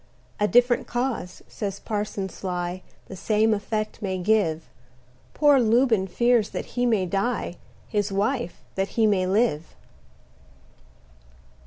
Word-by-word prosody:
A 210 - +3
different 245 +2 +3
cause, 240 -7 -3
says 200 -2 -5
Parson 205 -2 -3
Sly, 180 -1 -4 0.2
The 190 - -9
same 215 +3 +2
effect 215 +1 -3
may 190 -2 -2
give: 180 -5 +1 0.7
Poor 290 -2 +5
Lubin 230 -3 +3
fears 235 +2 +2
that - - -5
he 245 0 +1
may 215 -5 +2
die; 195 0 -2 0.3
His 205 -2 -1
wife, 205 0 -1
that 195 0 -1
he 225 - +4
may 195 -3 +2
live. 190 -6 0
210 Hz, 125 wpm, -25 LUFS, 190-235 Hz, 0.7 s, Poor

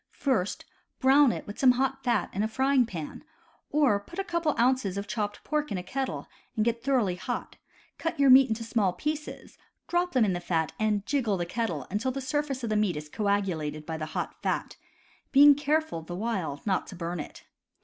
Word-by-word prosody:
First 225 -9 0 0.3
brown 270 0 +6
it - - -5
with 205 - -9
some 255 -2 +6
hot 270 +1 -1
fat 235 -7 +1
in 195 - -1
a 215 - +1
frying 265 +2 +2
pan; 165 - -7 0.5
or, 285 -9 +3
put 270 +12 -13
a 390 - 0
couple 340 -4 0
of - - -6
ounces 240 -6 +2
of 200 - -3
chopped 205 0 -3
pork 300 -1 -1
in 200 - -1
a 180 - -4
kettle 265 +7 -3 0.3
and 215 -2 +1
get 235 0 +1
it 230 - -28
thoroughly 240 -9 +1
hot; - - -5 0.4
cut 330 -3 -3
your 275 -2 +6
meat 265 0 +8
into 225 +1 -2
small 220 -5 +1
pieces; 300 +4 -5 0.3
drop 350 +1 0
them 250 -4 +4
into 195 - +1
the 175 - -2
fat 165 -3 -1
and 210 -2 +1
"jiggle" 235 -9 0
the 175 - -2
kettle 175 - -2
until 215 +6 0
the 275 - -4
sur 280 +3 0
face 270 -4 -5
of 225 - -2
the - - +1
meat 205 -6 +1
is 150 0 -7
coagulated 175 -7 -1
by 160 - -4
the 155 -1 -4
hot - - -4
fat, - - -2 0.6
being 290 +1 +8
care 295 +2 +1
ful, 315 - -7
the 175 +2 -7
while, 190 -8 -2
not 195 -3 0
to - - -9
burn 170 0 -4
it. 150 - -8
225 Hz, 220 wpm, -28 LUFS, 185-270 Hz, 0.6 s, meat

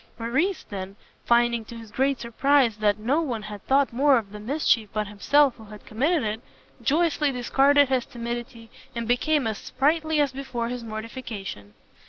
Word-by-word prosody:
Morrice 270 +12 0
then, 195 -1 -7 0.3
finding, 235 -1 +3
to 235 - -10
his 225 -2 -11
great 270 +2 +1
surprise, 245 0 +2
that 210 -1 +2
no 255 +9 +1
one 240 -9 -3
had 210 -1 -8
thought 275 -2 +3
more 275 +2 +4
of 210 -4 -4
the 210 - -8
mischief 230 -2 +1
but 215 0 -1
himself 260 +7 +2
who 220 - -13
had 210 0 -12
committed 285 +7 +1
it, 215 +1 -3 0.4
joyously 300 +2 +2
discarded 275 +3 +3
his 260 -2 0
timidity, 235 -1 -6 0.2
and 235 -1 -3
became 280 +4 +2
as 220 -2 -2
sprightly 315 +2 0
as 285 -3 +2
before 250 -3 -4
his 245 -1 -5
mortification. 215 - -7
240 Hz, 170 wpm, -25 LUFS, 220-280 Hz, 0.4 s, more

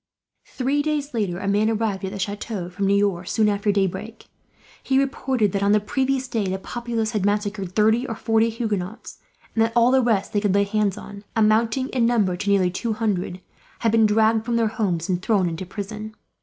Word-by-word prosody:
Three 275 +3 0
days 295 -1 -2
later 200 -7 -1
a 195 - -4
man 205 +2 +2
arrived 215 -4 -1
at 190 - -3
the 200 - -6
chateau 200 -1 -4
from 195 +2 -1
Niort, 195 -3 +1
soon 220 -2 +2
after 205 0 +1
daybreak. 200 +3 -2 0.6
He 265 - +1
reported 265 -5 +1
that, 200 - -1
on 200 +1 +3
the 210 - +5
previous 265 +4 -1
day, 220 -5 -1
the 190 +1 -1
populace 230 +1 -3
had 210 -4 -1
massacred 205 -2 -1
thirty 220 +4 +3
or 225 - -4
forty 225 0 +2
Huguenots; 220 -3 -4 0.3
and 225 - +3
that 225 0 -1
all 240 +1 +5
the 265 0 +4
rest 225 -5 0
they 205 - +1
could 200 -2 +1
lay 200 - +4
hands 205 -1 0
on, 205 -1 -10
amounting 225 +4 +2
in 240 -3 +1
number 210 -7 +2
to 200 +3 -3
nearly 190 -3 +3
two 225 +5 -2
hundred, 190 -4 -2 0.4
had 230 - +2
been 225 -1 +4
dragged 220 +1 +3
from 235 +1 -1
their 230 -2 +2
homes 190 -7 -1
and 180 -1 -1
thrown 195 -2 +2
into 170 +2 -5
prison. 215 +2 -7
215 Hz, 205 wpm, -23 LUFS, 200-230 Hz, 0.6 s, the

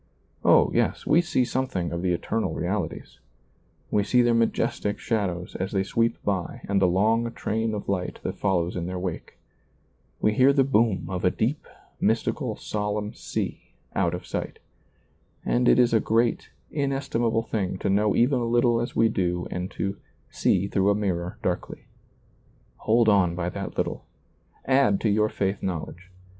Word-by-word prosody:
Oh, - - +5
yes, - - 0
we 170 - +5
see 145 -7 +1
something 120 -10 -2
of 85 0 -3
the 90 0 +1
eternal 90 0 -1
reali 90 0 -1
ties; - - -12 0.7
we 105 - +2
see 125 +4 +3
their 120 0 +3
majestic 115 -2 0
shadows 95 -6 -2
as 95 +3 -3
they 95 -1 +2
sweep 115 +4 0
by 95 -4 -2
and 100 -1 +1
the 95 - +5
long 110 +6 +2
train 110 0 -2
of 105 - -6
light 90 -2 -2
that - - -4
follows 90 -3 0
in 85 -1 -3
their 90 0 -4
wake; 90 -2 -5 0.8
we 105 - +2
hear 130 +5 +5
the 140 -1 +4
boom 115 -8 +2
of 90 0 -4
a 90 - +5
deep, 125 +10 -2 0.3
mystical, - - 0
solemn 105 0 -3
sea - - -4 0.3
out - - +1
of - - -8
sight - - -4 0.9
And 125 0 +2
it - - +5
is 120 -2 +4
a 110 - +5
great, 115 +2 +1 0.2
inestimable 135 -5 0
thing 100 -5 -2
to - - -3
know 105 +2 +2
even 125 +1 +3
as 120 - -1
little 120 0 +3
as 120 - -4
we 115 - +4
do 90 -4 -1
and 90 +1 -3
to 100 0 -3 0.2
" - - -37
see 95 +1 +3
through 100 0 +2
a 100 - +3
mirror 90 -4 -2
darkly." 90 -1 -3 0.9
Hold 115 +1 +2
on 95 -5 +4
by 85 0 -2
that - - -6
little. - - -2 0.6
Add 130 -7 +3
to 110 - +2
your 105 +1 +2
faith 95 -1 -2
knowledge. 90 0 -5
105 Hz, 175 wpm, -25 LUFS, 95-115 Hz, 0.9 s, Oh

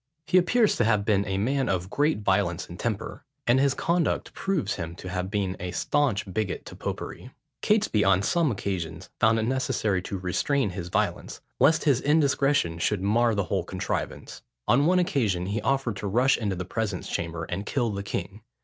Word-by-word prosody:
He 185 - +5
appears 215 +5 +3
to - - +3
have 105 -3 +2
been 100 -2 +2
a 95 -1 -1
man 130 +6 0
of 95 0 -1
great 145 -6 +1
violence 95 -3 +1
of 85 - -10
temper; 110 -4 -3 0.2
and 120 +2 +4
his 135 0 +2
conduct 170 -1 0
proves 170 - -1
him 85 -1 -5
to 90 - -8
have 90 +1 -3
been 100 -2 -1
a 90 - -4
staunch 130 0 0
bigot 105 -2 -2
to - - -10
popery. - - -6 0.3
Catesby 210 - +2
on 95 0 +3
some 165 - +2
occasions 90 -4 -4
found 110 0 +4
it 110 - 0
necessary 115 -6 0
to 100 +1 -5
restrain 100 +6 0
his 90 -1 -6
violence, - - -1 0.2
lest 165 +1 +4
his 140 -5 +3
indiscretion 140 - +2
should 95 +2 0
mar 115 +3 +3
the 100 - +1
whole 95 -1 -1
contrivance. 90 +1 -4 0.3
On 140 +5 +4
one 180 +1 +4
occasion, 110 - +1
he 105 +4 -2
offered 135 -6 0
to 100 - -4
rush 125 +7 +3
into 100 -4 -2
the 90 0 -4
presence 105 -1 -3
chamber, 85 -1 -3
and 90 +5 -4
kill 120 -5 0
the 100 -1 -3
king. 100 +1 -5
105 Hz, 190 wpm, -26 LUFS, 95-135 Hz, 0.3 s, He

